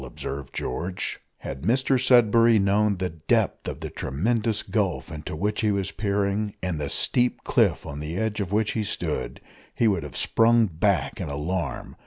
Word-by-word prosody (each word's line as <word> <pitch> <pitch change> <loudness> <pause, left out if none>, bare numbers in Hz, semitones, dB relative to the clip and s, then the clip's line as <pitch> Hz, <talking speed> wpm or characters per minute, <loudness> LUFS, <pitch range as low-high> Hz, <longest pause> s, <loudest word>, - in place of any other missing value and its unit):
observed 65 +1 -6
George. 90 +8 -3 0.2
Had 65 - -6
Mr 130 +6 +2
Sudberry 115 -2 +5
known 100 +1 +2
the 90 -1 -2
depth 80 -2 0
of - - -5
the - - -5
tremendous 110 - -1
gulf 100 -5 -1
into 75 0 -6
which 105 +6 -1
he 105 -2 +2
was 100 -2 -1
peering, 100 0 -1
and 85 -5 -2
the 70 - -2
steep 125 - +1
cliff - - +2
on 70 0 -6
the 75 +4 -4
edge 110 0 -1
of 100 -3 -3
which 105 +1 +1
he 110 - -1
stood, 105 - -3 0.4
he 115 - +3
would 95 -5 +2
have 75 -4 -7
sprung 115 0 +4
back 80 -6 0
in - - -4
alarm. 75 -1 -3
100 Hz, 175 wpm, -25 LUFS, 80-110 Hz, 0.4 s, Sudberry